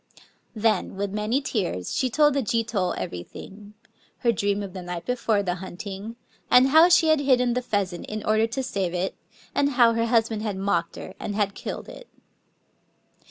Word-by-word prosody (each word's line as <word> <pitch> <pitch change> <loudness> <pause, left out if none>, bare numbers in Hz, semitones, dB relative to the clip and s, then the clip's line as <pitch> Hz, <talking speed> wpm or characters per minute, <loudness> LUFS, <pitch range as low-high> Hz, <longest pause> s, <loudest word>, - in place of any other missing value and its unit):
Then, 220 0 +1
widi 200 0 -3
many 215 +6 0
tears, 180 - -2
she 260 - +1
told 295 +3 +4
the 280 - +1
Jito 220 -5 -1
crerythii^: 200 - -8 0.5
her 235 - +3
dream 205 -1 -1
of 195 -2 -7
die 185 - -6
night 175 -1 -6
before 225 -4 0
the 180 -2 -1
hunting, 195 +4 -7 0.3
and 255 +2 +6
how 320 +5 +7
she 340 -2 +5
had 315 -1 +4
hidden 250 -3 +3
die 250 - 0
pheasant 200 -7 -2
in 215 0 -5
order 215 +1 +3
to 265 +4 -3
saTe 195 -8 -2
it, 185 +2 -2 0.4
and 285 - +2
how 235 -2 +6
her 230 0 0
hus 230 -1 +3
band 220 -2 -4
had 210 -3 -3
mocked 175 -4 -1
her, - - -8
and 205 - -4
had 200 -2 0
killed - - -6
it. - - -11
215 Hz, 185 wpm, -25 LUFS, 195-250 Hz, 0.5 s, how